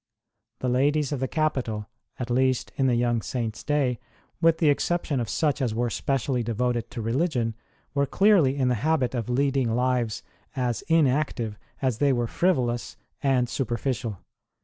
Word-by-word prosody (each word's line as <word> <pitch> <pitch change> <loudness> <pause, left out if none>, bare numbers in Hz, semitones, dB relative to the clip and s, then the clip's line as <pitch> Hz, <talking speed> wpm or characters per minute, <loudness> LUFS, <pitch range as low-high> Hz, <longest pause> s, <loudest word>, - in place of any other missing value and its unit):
The 130 - -1
ladies 140 +3 +2
of 145 - -1
the 130 - -1
capital, 130 -10 -1 0.3
at 125 -1 -4
least 130 +1 +1
in 135 - +2
the 125 - +3
young 120 -1 +1
Saint 115 -1 -3
s - - -10
day 140 -5 +1 0.4
with 165 -1 +4
the 160 -3 +3
exception 155 -1 0
of 115 -4 -2
such 150 - 0
as 120 -4 0
were 120 0 0
specially 135 -1 0
devoted 120 +1 -1
to 120 -3 -5
religion 120 -1 0 0.4
were 140 -1 +1
clearly 190 -10 +4
in 130 -2 +2
the 125 - +3
habit 145 -5 +1
of 120 -2 -3
leading 130 -2 +1
lives 125 -3 0 0.3
as 125 -3 -1
inactive 140 -8 +1 0.3
as 125 -4 0
they 145 -1 +4
were 120 -1 0
frivolous 120 -6 0 0.2
and 130 -3 +2
superficial. 120 -3 -2
130 Hz, 165 wpm, -26 LUFS, 120-140 Hz, 0.4 s, with